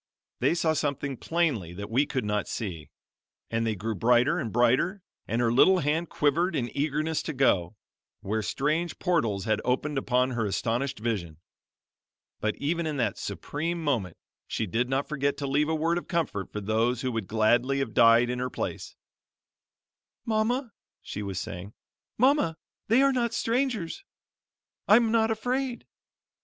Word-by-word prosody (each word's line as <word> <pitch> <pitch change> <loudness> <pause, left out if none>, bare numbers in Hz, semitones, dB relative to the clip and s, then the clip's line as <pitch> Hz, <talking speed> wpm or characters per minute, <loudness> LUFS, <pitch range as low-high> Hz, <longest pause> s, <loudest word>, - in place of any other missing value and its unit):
They - - +2
saw 160 -2 +2
something 140 -2 -2
plainly 135 - -1
that 100 +4 -7
we 135 +5 +2
could 130 -5 -2
not 105 0 -1
see; 85 -8 -5 0.6
and 115 0 0
they 110 - 0
grew 110 +4 -3
brighter 120 - +3
and 115 - -3
brighter, 130 - +2 0.2
and 115 - -1
her 120 -1 +2
little 185 +9 +6
hand 160 +1 0
quivered 170 +4 +1
in 120 -4 -2
eagerness 155 +2 0
to 160 - -4
go, 110 - +2 0.5
where 110 +3 -1
strange 155 +9 -1
portals 115 - 0
had 110 -1 +1
opened 135 +3 0
upon 125 0 +1
her 120 -2 -1
astonished 120 +7 -1
vision. 100 -9 -3 1.0
But 110 0 -1
even 165 +3 -1
in 150 -2 -2
that 115 -6 -1
supreme 165 +3 -3
moment 115 - -1 0.3
she 110 - -2
did 115 +6 -1
not 135 +1 0
forget 140 -2 -1
to 140 - -3
leave 145 +3 +1
a 160 - +1
word 165 +2 +1
of - - -14
comfort 160 - -2
for 105 - -4
those 115 +4 +1
who 130 - -1
would 115 -5 -3
gladly 120 +5 +2
have 135 -5 -2
died 115 +1 +5
in 125 - -3
her 125 0 -1
place: - - -5 1.3
"Mama," 230 +2 0 0.3
she 105 - -5
was 100 -3 -3
saying, 100 +1 -7 0.4
"Mama, 255 - +3 0.3
they 235 +5 +5
are 275 0 +4
not 235 -2 0
strangers. 230 -7 -1 0.8
I'm 225 +2 +5
not 225 -1 +3
afraid." 245 +3 -2
135 Hz, 160 wpm, -27 LUFS, 115-170 Hz, 1.3 s, little